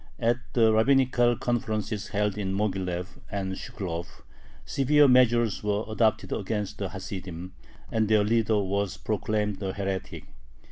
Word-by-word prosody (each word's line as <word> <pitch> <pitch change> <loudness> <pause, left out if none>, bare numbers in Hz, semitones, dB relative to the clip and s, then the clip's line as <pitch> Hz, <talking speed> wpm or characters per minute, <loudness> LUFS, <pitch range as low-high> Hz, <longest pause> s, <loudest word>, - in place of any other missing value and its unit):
At 120 +1 +1
the 110 -2 +4
rabbinical 120 0 +3
conferences 110 -3 -2
held 105 -1 0
in 95 -2 -2
Moghilev 95 -2 -2
and 95 -2 -3
Shklov 85 -3 -6 0.4
severe 145 +2 +4
measures 120 -5 +4
were 105 +1 0
adopted 110 0 +1
against 105 0 -3
the 100 -2 -2
Hasidim, 95 -2 -7 0.4
and 110 -1 +1
their 105 -1 +4
leader 110 0 +2
was 100 0 -1
proclaimed 105 -1 -1
a 95 -1 -2
heretic. 95 -1 -4
105 Hz, 130 wpm, -27 LUFS, 95-115 Hz, 0.4 s, the